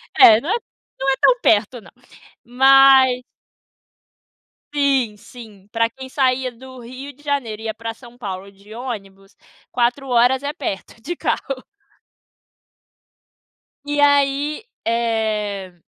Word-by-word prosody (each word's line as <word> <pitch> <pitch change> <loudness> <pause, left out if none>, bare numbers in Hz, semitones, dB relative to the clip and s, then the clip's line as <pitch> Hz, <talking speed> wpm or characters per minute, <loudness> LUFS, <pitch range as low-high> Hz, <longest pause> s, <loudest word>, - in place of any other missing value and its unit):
É, 220 -1 +8
não 305 - -6
é 415 - +2 0.5
não 270 +1 0
é 265 - 0
tão - - +4
perto 220 - +2
não. - - -17 0.5
Mas 265 0 +5 1.5
Sim, 270 -7 +1
sim, 210 -4 -14
pra 230 0 +1
quem 260 +2 -11
saía 260 -2 0
do 260 +2 -13
Rio 255 +4 -9
de 290 +3 -23
Janeiro 255 -7 -2
e 225 - -9
ia 220 - -2
pra 230 0 -6
São 240 +1 -16
Paulo 195 -3 -7
de 200 +2 -16
ônibus, 195 -5 -8 0.4
4 250 +2 0
horas 245 +2 +3
é 285 - -2
perto, 225 -4 -6
de 345 +8 -5
carro. 270 -4 -3 2.2
E 290 0 -2
aí, 285 +3 +2 0.2
eh, 215 -5 -1
245 Hz, 130 wpm, -20 LUFS, 220-270 Hz, 2.2 s, É